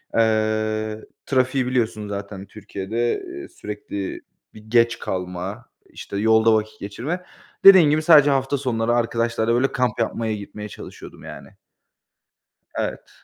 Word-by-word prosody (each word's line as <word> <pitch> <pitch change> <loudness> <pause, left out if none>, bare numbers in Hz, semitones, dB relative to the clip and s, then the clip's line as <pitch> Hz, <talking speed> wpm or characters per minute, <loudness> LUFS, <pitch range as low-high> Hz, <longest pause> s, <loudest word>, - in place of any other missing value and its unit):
eee, 110 -1 +1 0.2
trafiği 130 -1 +1
biliyorsun 110 -4 -1
zaten 100 -1 -6
Türkiye'de, 110 - -3
ııı, 355 0 -8
sürekli 100 -1 -6 0.3
bir 110 - -13
geç 115 0 +3
kalma, 90 +5 -5 0.2
işte 100 - -7
yolda 110 +1 +4
vakit 110 0 -1
geçirme. 140 - -5 0.4
Dediğin 190 -6 +9
gibi 155 +1 +2
sadece 155 -3 +7
hafta 135 0 +1
sonları 120 -3 0
arkadaşlarla 115 -1 0
böyle 130 +3 +2
kamp 125 -3 -1
yapmaya 115 -1 -1
gitmeye 105 +1 -8
çalışıyordum - - -11
yani. - - -10 1.3
Evet. - - -4
115 Hz, 120 wpm, -22 LUFS, 105-130 Hz, 1.3 s, Dediğin